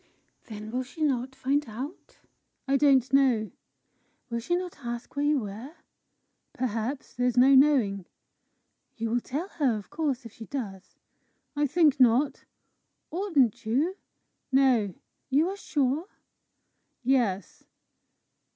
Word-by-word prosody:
"Then 215 -1 -8
will 250 +2 -1
she 275 +5 -6
not 265 -2 0
find 280 +3 +1
out?" 260 - -8 0.5
"I 275 - +2
don't 275 -2 +4
know." 250 -6 +3 0.8
"Will 235 - -1
she 305 +10 -1
not 360 -3 -4
ask 240 -2 -6
you - - -23
where - - +1
you 300 -2 +3
were?" 220 +9 -8 0.8
"Perhaps. 245 +2 -3
There's 245 0 0
no 260 +2 +7
knowing." 255 -10 +4 0.9
"You 225 -1 -2
will 240 +1 +1
tell 295 +10 -4
her, 275 - 0
of 205 - -10
course, 290 -5 -2
if 230 - -9
she 225 - -10
does?" 200 -9 -6 0.6
"I 290 0 +2
think 300 -2 +3
not." 255 +3 +3 0.7
"Oughtn't 320 - +1
you?" 280 +12 0 0.6
"No." 255 -8 +3 0.3
"You 295 +6 +3
are 390 - -4
sure?" 295 -3 -1 1.0
"Yes." 255 +3 0
260 Hz, 130 wpm, -27 LUFS, 230-290 Hz, 1.0 s, no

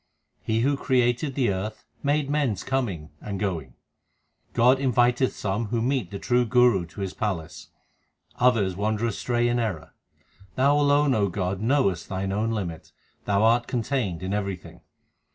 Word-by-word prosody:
He 110 0 0
who 140 +3 +2
created 125 +1 +1
the 125 -7 +2
earth 105 +3 -5 0.2
made 145 0 +1
men 145 -5 +1
s 100 - -7
coming 105 - -2
and 100 -2 -5
going. 80 -11 -3 0.8
God 125 +3 +4
inviteth 125 0 +2
some 105 +3 -2
who 115 +2 -1
meet 125 -5 0
the 100 - -6
true 125 +4 +2
Guru 120 -6 +3
to 100 - -9
His 95 -1 -3
palace; 95 -8 -4 0.7
others 115 -7 +3
wander 105 +3 -1
astray 120 +2 0
in 120 0 +1
error. 85 -9 -3 0.6
Thou 140 +3 +3
alone, 145 -1 +3
O 100 -3 +1
God, 95 0 -2
knowest 110 - +1
Thine 95 0 -2
own 105 +3 0
limit; 95 -8 -4 0.3
Thou 100 +1 +2
art 115 +1 +3
contained 115 -8 -2
in 95 +1 -2
everything. 100 -4 -4
115 Hz, 155 wpm, -25 LUFS, 95-125 Hz, 0.8 s, God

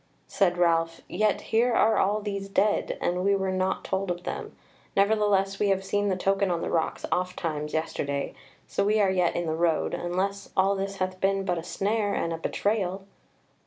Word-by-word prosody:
Said 180 -3 +1
Ralph: 165 -1 +2
"Yet 210 +2 +1
here 235 +2 +4
are 220 0 +4
all 210 +2 +2
these 200 -1 -4
dead, 205 +1 +1
and 180 +1 0
we 200 +1 +3
were 190 -1 -1
not 185 0 -1
told 190 0 -2
of 175 0 -3
them, - - -5 0.4
nevertheless 200 -1 +2
we 210 - +2
have 195 -1 +1
seen 205 +1 0
the 190 - +1
token 195 +1 +1
on 170 -1 -1
the - - -2
rocks 160 -1 -1
oft 180 0 -1
times 150 -3 -3
yesterday, 140 -3 -2 0.3
so - - 0
we 210 +2 +2
are 195 -2 +4
yet 180 -2 +1
in 175 - -1
the 160 - -1
road, 165 0 +1
unless 195 +3 -2
all 195 +1 +4
this 195 0 -3
hath 185 -1 -3
been 195 0 +1
but 175 -2 0
a - - -7
snare 205 +2 -1
and 165 - -1
a 165 - -5
betrayal." 195 +1 -1
190 Hz, 200 wpm, -27 LUFS, 175-200 Hz, 0.4 s, here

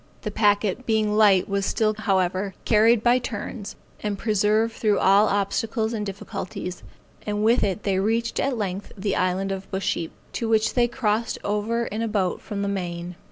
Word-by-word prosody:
The 210 - -3
packet 205 +2 +1
being 215 -2 +2
light 205 -4 +5
was 200 0 -1
still, 215 +2 +1
however, 190 -2 0
carried 225 +1 +4
by 245 +1 +4
turns, 215 -2 -6 0.3
and 205 -1 -2
preserved 215 +2 +1
through 210 -3 +1
all 200 +3 +5
obstacles 220 +3 0
and 215 -2 -2
difficulties; 195 -2 -6 0.5
and 210 0 -1
with 230 +3 +4
it 200 +1 -1
they 195 -2 +1
reached 230 +3 0
at 270 -3 0
length 195 -2 -4
the 200 0 -1
island 185 +2 0
of 195 0 -5
Busheap, 190 -3 -2 0.2
to 230 - -2
which 220 -1 +2
they 240 -1 +3
crossed 230 -2 -1
over 215 +3 -1
in 215 +1 -4
a 230 - 0
boat 195 -4 -1
from 200 -1 -4
the - - -1
main. 175 -3 -4
210 Hz, 175 wpm, -24 LUFS, 195-225 Hz, 0.5 s, light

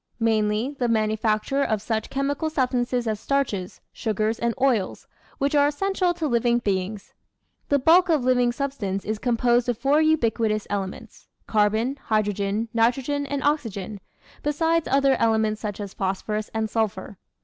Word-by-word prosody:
Mainly 220 +3 +1
the 245 - +1
manufacture 220 +3 +1
of 220 -6 +1
such 220 +1 -3
chemical 285 +3 -1
substances 250 -4 0
as 215 -2 -2
starches, 230 -11 -2
sugars, 220 0 -1
and 235 -1 0
oils, 245 -8 0 0.3
which 280 +1 0
are 285 -1 +5
essential 370 +4 0
to 325 -3 -2
living 240 -1 +2
beings. 200 -2 -3 0.6
The 285 - +4
bulk 345 +6 +5
of 305 -6 +2
living 250 -1 +3
substance 240 -8 -3
is 215 0 -2
composed 240 0 +2
of 240 - 0
four 280 +5 +3
ubiquitous 230 -8 +1
elements 195 -2 -5 0.2
carbon, 220 +6 +1
hydrogen, 210 0 0
nitro 235 +4 +2
gen, 285 +1 -2
and 285 0 -3
oxygen 215 -9 -1 0.4
besides 325 +2 +1
other 275 0 +4
elements 220 -1 +1
such 210 -2 -4
as 200 -2 -6
phosphorus 210 +3 -3
and 220 0 -1
sulphur. 215 -3 -3
230 Hz, 150 wpm, -24 LUFS, 215-275 Hz, 0.6 s, are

